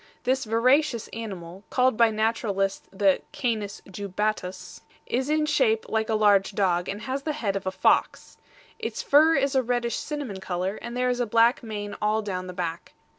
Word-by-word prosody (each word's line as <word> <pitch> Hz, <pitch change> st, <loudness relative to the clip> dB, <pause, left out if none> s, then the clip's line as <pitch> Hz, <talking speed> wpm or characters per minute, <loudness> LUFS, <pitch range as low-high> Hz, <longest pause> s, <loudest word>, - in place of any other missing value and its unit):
This 260 Hz, 0 st, +1 dB
voracious 245 Hz, +3 st, +2 dB
animal, 195 Hz, -5 st, -7 dB
called 255 Hz, -1 st, +2 dB
by 230 Hz, 0 st, +5 dB
naturalists 215 Hz, -3 st, -1 dB
the 195 Hz, -1 st, +2 dB
Canis 215 Hz, -5 st, -3 dB
jubatus, 200 Hz, 0 st, -4 dB, 0.2 s
is 260 Hz, +3 st, -1 dB
in 305 Hz, 0 st, +2 dB
shape 445 Hz, +7 st, +2 dB
like 220 Hz, 0 st, 0 dB
a 220 Hz, -, +2 dB
large 205 Hz, -2 st, +3 dB
dog, 180 Hz, -3 st, +1 dB
and 205 Hz, +2 st, -4 dB
has 270 Hz, +1 st, -3 dB
the 305 Hz, +2 st, -2 dB
head 210 Hz, -9 st, -2 dB
of 195 Hz, -1 st, -4 dB
a -, -, +1 dB
fox. -, -, +1 dB, 0.4 s
Its -, -, -4 dB
fur 310 Hz, +3 st, +5 dB
is 275 Hz, 0 st, +1 dB
a 265 Hz, -, +3 dB
reddish 240 Hz, -2 st, -1 dB
cinnamon 285 Hz, -10 st, -5 dB
color, 190 Hz, +1 st, -3 dB
and 235 Hz, +1 st, -6 dB
there 250 Hz, 0 st, +2 dB
is 245 Hz, -, -2 dB
a 245 Hz, -, 0 dB
black 230 Hz, +3 st, +4 dB
mane 210 Hz, -3 st, -5 dB
all 215 Hz, +1 st, +1 dB
down 185 Hz, -3 st, -4 dB
the 180 Hz, -, -7 dB
back. 170 Hz, -2 st, -5 dB
220 Hz, 180 wpm, -26 LUFS, 195-250 Hz, 0.4 s, by